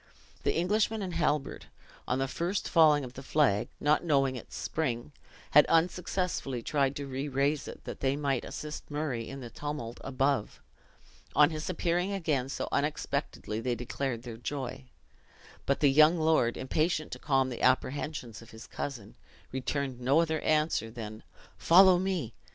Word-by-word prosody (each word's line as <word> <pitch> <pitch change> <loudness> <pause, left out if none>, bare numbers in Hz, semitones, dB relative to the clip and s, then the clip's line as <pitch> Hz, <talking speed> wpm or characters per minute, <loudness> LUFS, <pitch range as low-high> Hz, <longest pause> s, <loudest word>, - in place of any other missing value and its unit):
The - - 0
Englishman 210 +5 +1
and 180 -2 -4
Halbert, 145 -3 -1 0.4
on 125 - +1
the 135 0 0
first 175 +8 -2
falling 155 -3 +5
of 125 -1 -8
the 135 - -8
flag, 135 -7 +2
not 150 +3 +2
knowing 135 -5 +2
its 125 - -9
spring, 135 -4 -2 0.4
had 150 - +8
unsuccessfully 170 -6 0
tried 140 0 +1
to 140 - -4
re 135 +1 -4
raise 140 +2 0
it, - - -9
that - - -7
they 135 0 +1
might 140 -3 -1
assist 150 0 -7
Murray 145 -6 -3
in 135 0 -7
the 120 -2 -8
tumult 135 -3 -5
above. 135 -3 0 0.8
On 150 +1 +6
his 155 +1 -4
appearing 180 +2 0
again 150 -9 -1
so - - -3
unexpectedly, 140 -6 -2
they 120 +1 -1
declared 120 0 -3
their 120 -3 -7
joy; 125 - -5 0.8
but 140 - +1
the 145 -2 +5
young 155 +4 +6
lord, 155 -7 +2
impatient 155 +4 -1
to - - -6
calm 135 -2 +1
the 120 - -6
apprehensions 130 -2 0
of 115 - -14
his 110 +1 -11
cousin, 125 -8 -6 0.4
returned 130 -1 -3
no 135 +5 +4
other 160 -1 +1
answer 155 -7 +1
than 110 -2 -8 0.4
"Follow 185 +1 +7
me!" 180 - -2
140 Hz, 160 wpm, -30 LUFS, 130-155 Hz, 0.8 s, had